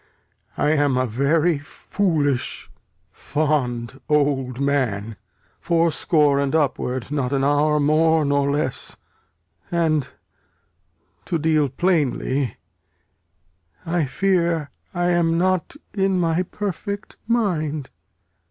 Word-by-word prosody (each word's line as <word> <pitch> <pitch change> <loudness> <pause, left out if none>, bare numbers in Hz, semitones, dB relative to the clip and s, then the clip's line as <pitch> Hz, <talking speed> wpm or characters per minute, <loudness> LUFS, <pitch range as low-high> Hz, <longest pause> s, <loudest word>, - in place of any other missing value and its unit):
I 150 - +2
am 145 -4 +2
a 130 - +2
very 145 +7 +1
foolish 145 -3 -1 0.4
fond 135 -5 -2
old 140 -4 +1
man, 120 -7 0 0.4
Fourscore 160 -3 +2
and 140 +2 0
upward, 130 -4 -1
not 140 -4 -1
an 135 -1 +1
hour 150 +2 +3
more 155 +1 +3
nor 140 0 +1
less; 140 -2 -2 0.7
And, 160 -5 0 1.1
to 170 - -1
deal 155 -2 +2
plainly, 140 -4 0 1.3
I 165 -2 0
fear 170 -1 0 0.2
I 175 0 0
am 170 -1 +2
not 185 - 0 0.2
in 195 -2 +1
my 165 0 +1
perfect 200 +2 -5
mind. 155 - -1
150 Hz, 95 wpm, -22 LUFS, 140-170 Hz, 1.3 s, hour